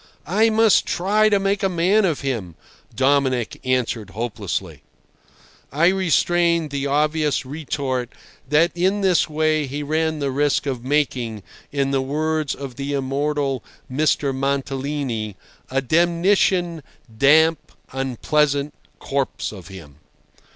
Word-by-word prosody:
"I 215 +7 +3
must 220 -1 +4
try 210 +4 +2
to 205 - +3
make 195 +1 0
a 195 - +1
man 185 +4 +2
of 165 -6 -1
him," 115 -12 -3 0.4
Dominic 130 -2 +1
answered 125 -5 -1
hopelessly. 115 +2 -4 0.9
I 165 +5 +4
restrained 175 -3 +2
the 140 0 -2
obvious 150 -1 +1
retort 135 -3 -3 0.4
that 160 +4 +4
in 190 +4 +1
this 185 -4 +2
way 155 -1 +1
he 145 +3 -4
ran 155 +1 0
the 140 -2 -2
risk 145 +2 +1
of 130 -4 -3
making, 125 -6 -1 0.3
in 140 -1 0
the 135 -1 +1
words 155 +2 -1
of 135 -3 -8
the 140 +1 -3
immortal 140 -1 -1 0.3
Mr. 140 0 +1
Mantalini, 135 -5 -2 0.3
"a 135 +1 0
demnition 175 +2 +2 0.3
damp, 155 +4 +4 0.2
unpleasant 140 +3 0 0.3
corpse 135 -1 -2
of 95 -6 -11
him." 80 -7 -12
145 Hz, 125 wpm, -21 LUFS, 135-165 Hz, 0.9 s, must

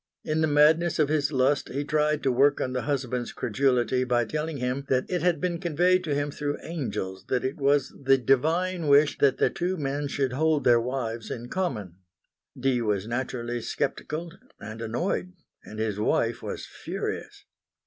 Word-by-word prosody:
In 155 +1 0
the 160 - +3
madness 155 +3 +4
of 150 -2 +2
his 150 -1 +1
lust 135 +1 +1
he 140 +2 -2
tried 150 0 +1
to 135 - +3
work 140 +3 +3
on 130 - -2
the 125 - -1
husband's 125 -4 -2
credulity 125 +1 +1
by 120 -2 +1
telling 155 +5 -3
him 125 +2 -2
that 130 -1 +1
it 180 -1 -1
had 175 -3 +2
been 175 0 -1
conveyed 180 +2 +2
to 150 -3 0
him 145 0 -1
through 145 0 -3
angels 105 - -4
that 125 -1 0
it 130 - -2
was 140 -1 +2
the 135 0 +5
Divine 160 +7 +1
wish 145 +1 +4
that 140 -2 +4
the - - +2
two 180 +2 -2
men 145 -1 -2
should 135 -2 -1
hold 155 +2 +2
their 120 -1 +5
wives 115 -3 -3
in 120 0 -6
common. 110 - -3 0.6
Dee 130 -1 +1
was 105 -3 0
naturally 120 0 -3
sceptical 165 +8 -3 0.3
and 110 +1 -8
annoyed, 170 - -2 0.3
and 110 - -10
his 110 -2 -2
wife 105 - +1
was - - -5
furious. - - -6
140 Hz, 180 wpm, -26 LUFS, 125-155 Hz, 0.6 s, the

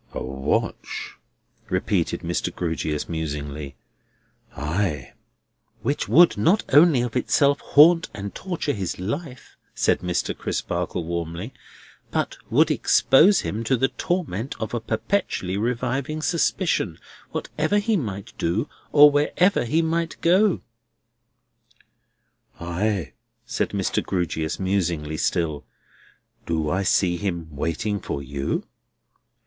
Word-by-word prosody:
"A - - -4
watch?" 65 +1 -3 0.5
repeated - - 0
Mr. - - -2
Grewgious 80 -3 -2
musingly. 75 -3 -4 0.8
"Ay!" 75 -1 -2 0.7
"Which 140 - -1
would 175 +1 +6
not 190 +6 +3
only 145 -4 +6
of 120 -1 -4
itself 140 +3 +3
haunt 165 +3 +5
and 100 -1 -6
torture 175 -6 -3
his 95 -4 -3
life," 125 - -6 0.2
said - - +2
Mr. 90 -1 -2
Crisparkle 90 - -3
warmly, 85 +6 -4 0.6
"but - - -1
would - - +4
expose 185 +9 +5
him 110 +3 -3
to 130 +2 +2
the 135 +3 +2
torment 140 - -2
of 110 - -4
a 120 - 0
perpetually 110 - -1
reviving 125 +7 -2
suspicion, 165 - 0 0.3
whatever 155 +7 -1
he 215 +2 +1
might 100 - -4
do, 95 - 0 0.2
or 150 0 +8
wherever 150 +4 +2
he 160 +8 +2
might 165 +1 -1
go." 185 +3 +3 2.0
"Ay!" 85 -3 -2 0.3
said - - -1
Mr. - - -1
Grewgious 85 -3 -2
musingly 85 -6 -1
still. 80 -5 -1 0.8
"Do 80 -2 0
I 95 +2 +1
see 90 -2 +2
him 85 -5 -4
waiting 85 +8 -2
for 70 - -4
you?" 70 0 -3
105 Hz, 115 wpm, -24 LUFS, -, 2.0 s, or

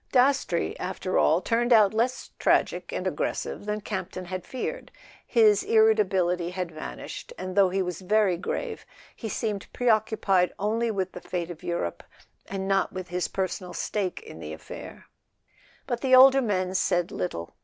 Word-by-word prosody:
Dastrey, 265 +2 +2
after - - -1
all, - - +4
turned 240 +1 0
out 215 -4 +6
less 240 +3 -1
tragic - - +1
and - - -3
aggressive 205 - -3
than 210 0 -2
Campton 185 -3 -5
had 185 0 -6
feared. 480 - -5 0.4
His 215 -4 +5
irritability 190 -6 +3
had 180 -1 -4
vanished, 155 - -8
and 185 0 -5
though 195 -2 +5
he 190 +1 0
was 180 0 -5
very 200 -1 +3
grave 445 - -4 0.3
he 225 - -6
seemed 210 -2 -3
preoccupied 215 -6 +2
only 225 +3 0
with 190 -3 -2
the 180 - -9
fate 175 -1 -4
of 165 - -10
Europe, 170 - -3 0.5
and 195 0 -4
not 195 0 +2
with 185 -2 -6
his 180 0 -1
personal 185 -1 -3
stake 195 -4 -2
in 455 - -11
the - - -6
affair. - - -10 0.8
But 240 -2 -3
the 260 -1 +5
older 270 +1 +8
men 185 -5 0
said 175 -2 +1
little. 85 -2 -4
195 Hz, 160 wpm, -26 LUFS, 180-225 Hz, 0.8 s, older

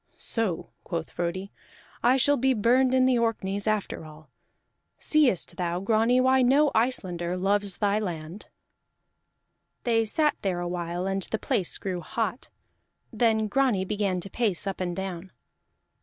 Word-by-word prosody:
"So," 220 -8 -2
quoth 165 -3 -4
Frodi, 175 +3 -3 0.5
"I 250 +2 +4
shall 285 +2 +4
be 265 0 +2
burned 250 +4 +3
in 255 0 +4
the 255 -2 +3
Orkneys 205 -3 -1
after 215 -5 -1
all. 155 0 -14 0.7
Seest 285 - +1
thou, 175 -1 -1
Grani, 225 +5 +2
why 260 +1 +4
no 275 +4 +4
Icelander 185 -7 0
loves 200 0 0
thy 205 0 +1
land?" 175 -2 -6 1.4
They 225 -2 +2
sat 300 +7 +1
there 185 -3 -1
a 175 - -3
while 175 0 -3
and 195 0 -1
the 220 - -1
place 185 -4 -1
grew 185 -3 -4
hot; 225 +6 -3 0.6
then 220 -1 +2
Grani 225 -4 +1
began 200 -2 -1
to 195 - -8
pace 215 -7 -1
up 195 -1 -4
and 175 -1 -2
down. 190 -1 -5
205 Hz, 145 wpm, -26 LUFS, 180-240 Hz, 1.4 s, I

